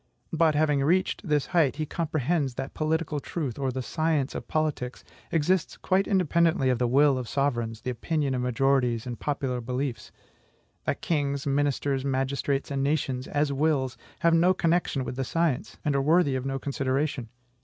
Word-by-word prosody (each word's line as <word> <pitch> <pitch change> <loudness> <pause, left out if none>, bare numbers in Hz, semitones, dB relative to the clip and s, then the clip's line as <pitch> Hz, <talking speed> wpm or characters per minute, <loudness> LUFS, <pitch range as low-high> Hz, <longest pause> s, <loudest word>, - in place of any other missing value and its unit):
But, 160 -2 +3
having 150 -2 +2
reached 185 +5 +1
this 150 -2 +2
height, 160 -6 +2
he 155 +1 -2
comprehends 155 -3 -1
that 135 +2 -5
political 155 -1 -1
truth, 140 -4 -4
or 135 -2 0
the 130 0 -4
science 155 -1 0
of - - -6
politics, 150 -5 -2 0.3
exists 165 +2 +1
quite 190 +1 +1
independently 170 -7 +2
of 125 - 0
the 125 - +2
will 135 +1 +4
of 125 - -6
sovereigns, 120 -5 -1
the 125 +1 -2
opinion 145 +2 -1
of 125 - -1
majorities, 125 -2 +1
and 120 -2 -5
popular 135 -4 -2
beliefs, 125 +1 -3 0.7
that - - -1
kings, 140 -4 -1
ministers, 140 -1 0
magistrates, 135 +1 -1
and 135 -1 -1
nations, 135 -3 -1
as 145 -1 0
wills, 140 -3 +1 0.3
have 170 0 +4
no 175 +3 +4
connection 165 -6 +1
with 125 +1 -5
the 135 - 0
science, 165 0 -1
and 145 -2 +1
are 140 - +2
worthy 155 0 +3
of 130 0 -2
no 135 0 -1
consideration. 135 -2 -2
140 Hz, 170 wpm, -27 LUFS, 130-155 Hz, 0.7 s, will